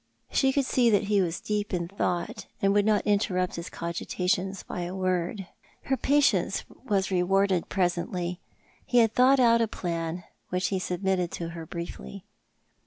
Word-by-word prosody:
She 270 -1 +3
could 275 0 +1
see 245 -2 +3
that 205 -2 +3
he 205 -2 +4
was 175 -2 -1
deep 210 -2 -2
in 170 -1 -2
tliought, 180 -2 -3
and 195 0 +2
would 205 0 +3
not 210 -1 +2
interrupt 195 -3 +1
his 170 - -5
cogitations 180 +3 -2
by 180 - -5
a 175 +2 -4
word. 185 +1 -1 0.4
Her 270 - +1
patience 285 +1 +2
was 200 -6 -2
rewarded 190 0 +2
presently. 180 -1 -1 0.4
He 245 - 0
had 225 -2 +5
thought 260 +3 +5
out 230 -2 +5
a 230 - +2
plan, 170 -4 -3 0.3
W'hich 180 0 0
he 190 - -1
submitted 180 -1 -1
to 170 -1 -4
her 165 -1 -8
briefly. 175 +4 -7
190 Hz, 165 wpm, -27 LUFS, 175-210 Hz, 0.4 s, had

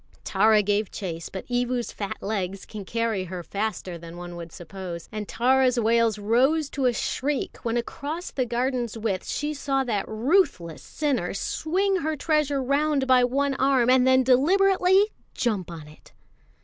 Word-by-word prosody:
Tara 215 -1 +4
gave 205 0 0
chase; 170 -4 -5
but 190 - -7
Evu's 245 0 -1
fat 200 -2 -6
legs 195 -2 -3
can 210 -3 -8
carry 225 -3 -1
her 180 0 -6
faster 200 -3 -4
than 170 +1 -10
one 175 0 -8
would 170 -1 -8
suppose, 175 -1 -8
and 210 -1 -5
Tara's 255 0 +2
wails 230 -1 +2
rose 260 +9 +2
to 270 -3 0
a - - +4
shriek 275 +4 -2
when 230 0 -1
across 295 +8 -4
half - - -20
the 255 -2 0
garden's 240 -1 -1
width 215 -4 -2
she 295 +1 -2
saw 275 -2 0
that 215 -6 -2
ruthless 225 - +1
sinner 265 - -2
swing 380 - 0
her 315 -2 -1
treasure 295 -2 0
round 280 +1 +1
by 255 -1 +5
one 275 +3 +1
arm 260 -2 +3
and 255 0 +4
then 260 0 +5
deliberately 380 - +4 0.2
jump 210 -8 -1
on 160 -3 -9
it. 150 - -18
240 Hz, 165 wpm, -25 LUFS, 200-280 Hz, 0.2 s, by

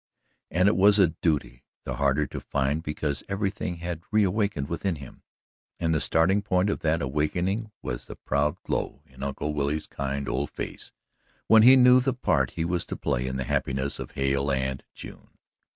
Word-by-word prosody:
And 90 +3 +2
it 100 - +4
was 100 +3 +6
a 95 -5 +5
duty 75 -6 -1 0.2
the - - -4
harder 70 +1 +2
to - - -6
find 70 +2 -1
because 75 -2 -3
everything 100 -2 -2
had 85 -1 -5
reawakened 100 -7 +1
within 85 +3 -2
him, 70 -4 -12 0.6
and 80 -1 +1
the 80 - +1
starting 95 +5 +2
point 100 0 +1
of - - -3
that 80 -1 0
awakening 90 - -1
was - - -5
the - - -8
proud 75 +5 -1
glow 70 - -3
in 65 -3 -16
Uncle 70 +2 -3
Billy's 75 +1 -1
kind 70 0 -4
old 70 +2 -1
face, - - -7 0.5
when 110 0 +7
he 125 +4 +9
knew 125 0 +7
the 130 0 0
part 125 - +1
he 80 - 0
was 85 0 -1
to - - -5
play - - -1
in 65 - -3
the 65 - -2
happiness 65 +2 -1
of - - -7
Hale 70 +1 0
and 65 0 -2
June. - - -11
80 Hz, 185 wpm, -26 LUFS, 70-95 Hz, 0.6 s, he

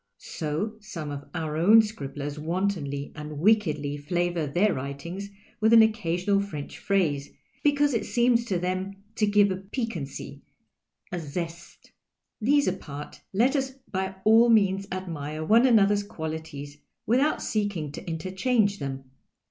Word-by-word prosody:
So 165 +8 -4
some 180 -8 -6
of 145 0 -6
our 160 -2 -2
own 210 +8 +7
scribblers 145 -7 -5
wantonly 160 -4 -2
and 150 0 -7
wickedly 155 -7 +2
flavour 175 +1 -1
their 180 +9 +2
writings 155 +9 -5 0.3
with 220 +1 +4
an 225 -1 +9
occasional 200 -2 +1
French 150 -8 -6
phrase, 155 -8 0 0.3
because 290 -1 +3
it 230 - -1
seems 240 -1 +3
to 195 -6 0
tlieni 185 +2 -2 0.3
lo 210 - +4
give 205 -1 +4
a 185 - -1
|)i<[uaney, 195 - -5 0.7
a 175 - -2
zest. 170 +2 -7 0.5
These 285 +5 +3
apart, 150 -6 -5
let 240 +8 +3
us 265 -1 -1 0.2
by 190 0 -2
all 225 +2 +6
means 200 -3 +3
admire 155 -4 -4
one 230 +8 +5
another's 205 -4 +4
qualities 160 -6 -6 0.3
without 265 +7 +2
seeking 200 -9 -2
to - - -8
interchange 200 +5 0
them. 135 -1 -4
185 Hz, 135 wpm, -26 LUFS, 155-215 Hz, 0.7 s, an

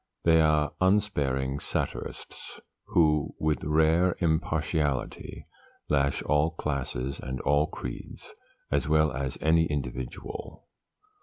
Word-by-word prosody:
They 80 -1 +5
are 75 -1 +3
unsparing 70 -9 +1
satirists, - - -5 0.3
who, 75 -3 +2
with 75 -1 0
rare 80 +4 +3
impartiality, 80 -4 -1 0.5
lash 70 -2 +1
all 75 +2 +2
classes 70 -4 -3
and 65 0 -5
all 75 +2 +2
creeds, 60 -5 -8 0.4
as - - +1
well 80 0 +4
as 65 0 -3
any 80 +1 +4
individual. 65 -4 -5
75 Hz, 100 wpm, -28 LUFS, 70-80 Hz, 0.5 s, They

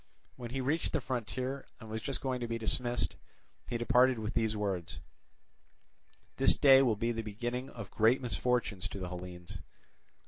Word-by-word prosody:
When 120 -1 -7
he 135 +2 -2
reached 150 +6 0
the - - +2
frontier 130 +2 -3
and 110 - -10
was 110 +1 -4
just 135 +4 -3
going 130 -2 -1
to 120 - -3
be 115 0 -2
dismissed, 120 +2 0 0.5
he 120 - -2
departed 125 +2 +4
with 110 0 -3
these 110 -2 +1
words: 90 -6 -3 1.4
"This - - +5
day 135 -1 +8
will 120 -5 +3
be 115 +3 0
the 115 -1 -2
beginning 120 +4 -4
of 115 -5 -9
great 115 +4 +4
misfortunes 120 -6 0
to - - -6
the 90 -1 -4
Hellenes." 90 +1 -7
115 Hz, 170 wpm, -32 LUFS, 105-125 Hz, 1.4 s, day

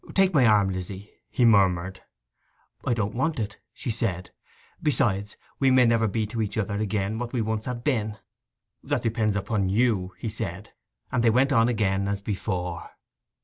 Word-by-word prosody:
'Take 195 -1 +4
my 135 -6 +5
arm, 105 -3 +4
Lizzy,' 95 +2 -6 0.2
he 125 - +2
murmured. 95 -4 +3 0.9
'I 120 - +2
don't 105 -2 -1
want 150 +4 -1
it,' 105 -1 -4
she 120 - -4
said. 95 -5 -2 0.5
'Besides, 105 -8 0 0.2
we 135 - +4
may 130 -1 +5
never 115 -1 +3
be 110 +2 -1
to 115 +2 -3
each 105 0 -3
other 100 -1 -1
again 105 0 -1
what 120 -1 -5
we 120 - 0
once 110 0 -2
have 125 -2 -4
been.' 110 -7 0 0.6
'That - - -2
depends 110 -2 0
upon 100 -1 0
you,' 100 -4 +1
said 105 -3 -4
he, - - -32 0.4
and 120 -2 +1
they 115 - +5
went 130 +5 +3
on 115 -3 +4
again 100 -4 0
as 100 0 -1
before. 90 -4 -3
110 Hz, 175 wpm, -26 LUFS, 100-120 Hz, 0.9 s, my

